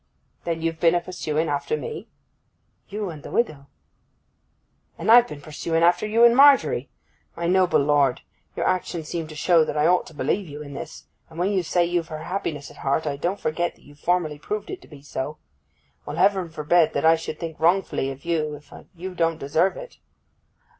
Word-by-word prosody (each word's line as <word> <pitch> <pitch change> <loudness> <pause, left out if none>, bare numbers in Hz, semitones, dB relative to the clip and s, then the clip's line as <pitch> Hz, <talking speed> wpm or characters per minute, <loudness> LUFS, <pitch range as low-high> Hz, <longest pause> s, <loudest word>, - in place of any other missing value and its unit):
'Then 165 -1 -2
you've 165 -1 -2
been 165 +1 +4
a - - +3
pursuing 165 -3 -2
after 145 - -1
me?' 460 -1 -6 0.8
'You 205 -2 -4
and 155 -2 -10
the - - -9
widow.' 150 -12 -1 1.3
'And - - +1
I've 240 +1 +8
been 145 -10 -9
pursuing 165 +2 -2
after 175 +5 +3
you 225 +2 +3
and 235 0 +7
Margery! 270 - +5 0.5
My 170 - -4
noble 185 +1 +3
lord, 140 -3 +2 0.3
your - - -1
actions 175 -3 -1
seem 165 -2 -3
to 155 - -10
show 165 +1 +4
that 155 - -3
I 150 - +3
ought 180 +2 +3
to 160 - -14
believe 175 +8 -1
you 145 0 -8
in 140 -1 -10
this; 140 - -8 0.2
and 160 - -14
when 180 +4 +1
you 195 -2 +1
say 175 +1 +1
you've 170 -1 -1
her 155 -1 -7
happiness 165 -6 -4
at - - -16
heart, 140 +3 0
I 145 -2 -1
don't 175 +8 -2
forget 170 +3 -1
that - - -25
you've 145 +1 -18
formerly 165 -4 0
proved 210 +6 -4
it 370 - -6
to - - -16
be 145 -2 -14
so. 150 +1 -5 0.7
Well, - - -6
Heaven 190 -4 +2
forbid 160 +1 +2
that 140 - 0
I 165 0 +7
should 160 -1 -6
think 165 -2 -6
wrongfully 170 -4 +1
of 135 +2 -9
you 155 -3 -1
if 145 0 -15 0.2
you 185 +2 -6
don't 165 -2 0
deserve 160 +6 +1
it! - - -10
165 Hz, 200 wpm, -24 LUFS, 150-185 Hz, 1.3 s, I've